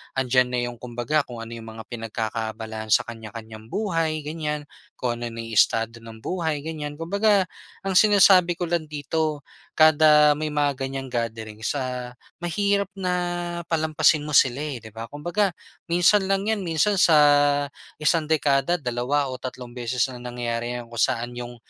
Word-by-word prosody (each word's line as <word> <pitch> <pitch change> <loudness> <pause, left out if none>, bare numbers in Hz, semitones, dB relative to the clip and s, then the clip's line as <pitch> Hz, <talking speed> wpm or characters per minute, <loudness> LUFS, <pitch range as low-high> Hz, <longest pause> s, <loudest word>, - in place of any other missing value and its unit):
'andiyan 130 -1 +3
na 125 0 -1
yung 120 - -10
kumbaga 125 +5 -1
kung 120 -2 -8
ano 115 - -10
yung 115 0 -10
mga 110 - -8
pinagkakaabalahan 110 -1 -4
sa - - +5
kanya-kanyang 110 -1 -9
buhay 165 - -1
ganyan, 150 -1 -3 0.3
kung 120 -2 -2
ano 120 -1 -4
na 115 - -5
yung 115 -1 -6
estado 115 +2 +3
ng 115 -1 -12
buhay, 160 -5 -2
ganyan. 150 -2 -5
Kumbaga, 200 +4 +2 0.4
ang 195 -1 +1
sinasabi 195 -4 +6
ko 175 -1 -3
lang 170 -2 0
dito 150 +1 -2 0.3
kada 150 -1 +6
may 155 0 -3
mga 145 -2 +1
ganyang 135 0 -5
gatherings 110 -2 -3
ah, 125 -1 -4 0.3
mahirap 200 +3 +1
na 185 -2 -2 0.6
palampasin 155 -1 +3
mo 150 - -1
sila 130 0 +4
eh, 150 -4 -3
'di 110 - -10
ba? 115 +1 -7
Kumbaga, 175 +8 0 0.4
minsan 180 +3 +4
lang 195 0 +1
'yan, 220 0 0
minsan 180 +3 +1
sa 160 -3 +6 0.8
isang 155 0 +1
dekada 145 +1 +2
dalawa 130 0 -1
o 130 - -7
tatlong 125 -1 -7
beses 125 -1 0
lang 125 - -9
nangyari 120 0 -3 0.2
kung 115 - -6
saan 120 +1 0
'yong 120 0 -7
145 Hz, 160 wpm, -24 LUFS, 120-165 Hz, 0.8 s, sinasabi